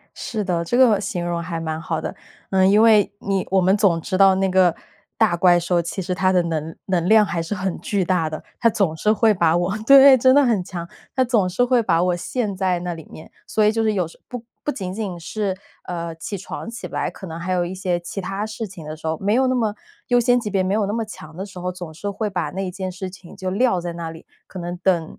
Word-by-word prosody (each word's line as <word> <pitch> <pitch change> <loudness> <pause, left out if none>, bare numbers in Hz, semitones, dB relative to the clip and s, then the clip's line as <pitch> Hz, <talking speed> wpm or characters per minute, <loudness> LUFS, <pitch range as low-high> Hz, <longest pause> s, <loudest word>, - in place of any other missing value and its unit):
是 215 -3 -4
的， 175 -3 -1
这 240 - -1
个 235 -6 +5
形 185 -4 -3
容 170 -1 -2
还 165 -1 -4
蛮 160 0 -3
好 160 -1 -3
的。 - - -5 0.4
嗯， 190 0 +4
因 210 +2 +5
为 215 -3 +5
你 195 -1 -1
我 190 0 +4
们 190 +2 +3
总 195 -5 +2
知 185 +3 -2
道 195 -1 +6
那 190 0 +1
个 185 -2 +4 0.4
大 210 -6 +3
怪 175 0 +5
兽， 175 0 +1
其 170 +3 -4
实 180 0 -2
它 185 +1 +2
的 180 -2 +3
能 160 -1 -3
能 180 -2 0
量 215 0 +6
还 170 -4 -2
是 185 +5 -4
很 190 -2 -3
巨 200 -3 -1
大 175 -3 +1
的。 155 0 -6 0.2
它 230 - +4
总 190 -7 0
是 210 +7 +2
会 220 0 +4
把 170 -4 +2
我 175 +4 0
对， 275 -1 +9
真 260 +2 +5
的 285 0 +6
很 225 -7 +2
强。 170 -2 -6 0.3
它 260 -1 +3
总 220 -7 +2
是 195 +7 +1
会 245 -1 +3
把 170 -5 +2
我 180 -1 +1
陷 210 +1 -3
在 185 -2 0
那 175 0 -3
里 160 -2 -10
面， 155 - -12 0.2
所 215 - +1
以 210 - +5
就 225 +1 0
是 215 - +2
有 185 -5 0
时 - - -17
候 - - -48
不 245 -2 -7 0.2
不 295 - 0
仅 185 -6 -5
仅 195 -4 -4
是， 190 +3 -3 0.3
呃， 170 -2 -5
起 200 +5 -5
床 190 +4 -7
起 230 0 -7
不 - - -12
来， - - -1
可 190 - -10
能 165 -1 -7
还 175 +2 -3
有 180 -1 +1
一 180 +2 -5
些 180 -2 -1
其 175 +3 -6
他 195 +2 -3
事 220 +1 -5
情。 180 -4 -11 0.4
没 200 +2 +1
有 260 +2 +3
那 255 - +1
么 220 -4 0 0.3
优 245 0 +4
先 245 +1 +3
级 215 -3 -4
别 195 -2 +1
没 190 +2 0
有 210 -2 +1
那 205 - -2
么 225 0 -1
强 160 -6 -11
的 190 - -5
时 195 -2 -11
候， 180 - -2
总 175 -3 -9
是 200 +6 -4
会 210 +2 -2
把 175 -6 -2
那 190 +2 -3
件 185 +1 -5
事 185 +1 -6
情 190 +1 -14
就 185 -1 -4
撂 200 -2 +2
在 170 0 -4
那 170 -1 -5
里， 160 - -12 0.2
可 190 - -9
能 175 0 -4
等， 175 -4 0
190 Hz, 285 characters per minute, -21 LUFS, 175-210 Hz, 0.4 s, 对